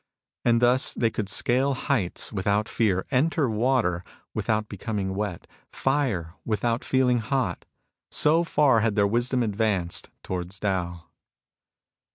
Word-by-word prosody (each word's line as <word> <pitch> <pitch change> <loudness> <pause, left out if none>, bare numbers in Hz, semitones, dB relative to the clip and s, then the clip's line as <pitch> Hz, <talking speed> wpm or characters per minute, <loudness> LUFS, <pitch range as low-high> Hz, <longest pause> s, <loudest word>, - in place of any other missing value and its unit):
And 115 0 +3
thus 125 +2 +3
they 115 -2 +1
could 105 -3 -3
scale 130 +5 +1
heights 120 -10 -1
without 105 +2 0
fear; 95 -5 +1
enter 145 +2 +2
water 110 -6 +1 0.3
without 110 -1 0
becoming 100 -1 -3
wet; 100 -3 -3 0.3
fire, 125 - -1
without 115 +2 -1
feeling 125 -2 +2
hot. 125 +3 -2 0.4
So 160 +3 +3
far 145 -7 +3
had 110 -1 +1
their 100 -2 +4
wisdom 120 +4 +1
advanced 100 -5 -1
towards 90 +1 -4
Tao. 90 -4 -2
110 Hz, 125 wpm, -26 LUFS, 100-125 Hz, 0.4 s, their